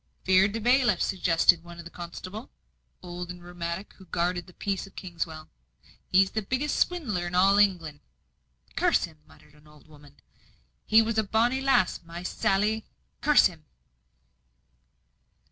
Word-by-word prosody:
"Fear'd 190 Hz, +3 st, +3 dB
o' -, -, -4 dB
bailiffs!" 240 Hz, -4 st, +3 dB
suggested 175 Hz, -2 st, +3 dB
the -, -, -23 dB
one 170 Hz, 0 st, -10 dB
constable, 185 Hz, +6 st, -8 dB, 0.5 s
old 180 Hz, 0 st, -7 dB
and 180 Hz, -1 st, -9 dB
rheumatic, 175 Hz, +2 st, -6 dB
who 190 Hz, -, -15 dB
guarded 175 Hz, +1 st, -2 dB
the 180 Hz, -, -15 dB
peace 195 Hz, +1 st, -3 dB
of 195 Hz, -, -19 dB
Kingswell. 165 Hz, -3 st, -6 dB, 0.6 s
"He's 190 Hz, +1 st, +3 dB
the 220 Hz, -, -2 dB
biggest 260 Hz, +8 st, -2 dB
swindler 225 Hz, -, -1 dB
in 175 Hz, -, -5 dB
all 195 Hz, +3 st, +5 dB
England." 170 Hz, -7 st, +1 dB, 0.8 s
"Curse 355 Hz, -2 st, +2 dB
him!" 160 Hz, -3 st, -8 dB
muttered 150 Hz, -, -21 dB
an 150 Hz, +1 st, -22 dB
old 150 Hz, -1 st, -20 dB
woman. 145 Hz, -2 st, -17 dB, 0.7 s
"She 220 Hz, +1 st, +6 dB
was 220 Hz, 0 st, -1 dB
a -, -, +2 dB
bonny 235 Hz, +5 st, +1 dB
lass 270 Hz, -9 st, +2 dB
my 170 Hz, +1 st, -9 dB
Sally! 210 Hz, +4 st, 0 dB, 0.4 s
Curse 295 Hz, -1 st, +5 dB
him!" 160 Hz, -3 st, -2 dB
185 Hz, 145 wpm, -27 LUFS, 170-215 Hz, 0.8 s, She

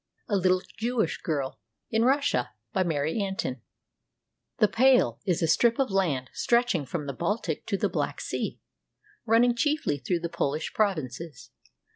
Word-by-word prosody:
A 205 Hz, -, 0 dB
LITTLE 185 Hz, -1 st, +2 dB, 0.2 s
JEWISH 235 Hz, 0 st, 0 dB
GIRL 140 Hz, -7 st, -2 dB, 0.3 s
IN 225 Hz, 0 st, +2 dB
RUSSIA 265 Hz, -, +1 dB, 0.2 s
BY 190 Hz, -, +2 dB
MARY 160 Hz, +4 st, 0 dB
AN 195 Hz, -1 st, -2 dB
TIN 130 Hz, -8 st, -3 dB, 1.0 s
["The 215 Hz, -, +5 dB
Pale" 245 Hz, -, +4 dB
is 180 Hz, -3 st, +1 dB
a -, -, +3 dB
strip 230 Hz, +8 st, +3 dB
of 270 Hz, -6 st, 0 dB
land 155 Hz, -10 st, 0 dB
stretching 235 Hz, -, +1 dB
from 150 Hz, +3 st, -3 dB
the 140 Hz, -, -4 dB
Baltic 170 Hz, -, -2 dB
to 200 Hz, -, 0 dB
the -, -, +1 dB
Black -, -, -2 dB
Sea, -, -, -3 dB, 0.7 s
running 235 Hz, +2 st, +5 dB
chiefly 290 Hz, -, 0 dB
through 170 Hz, +6 st, -1 dB
the 170 Hz, -, -1 dB
Polish 155 Hz, -1 st, -2 dB
provinces. 160 Hz, -, -2 dB
185 Hz, 155 wpm, -27 LUFS, 150-230 Hz, 1.0 s, The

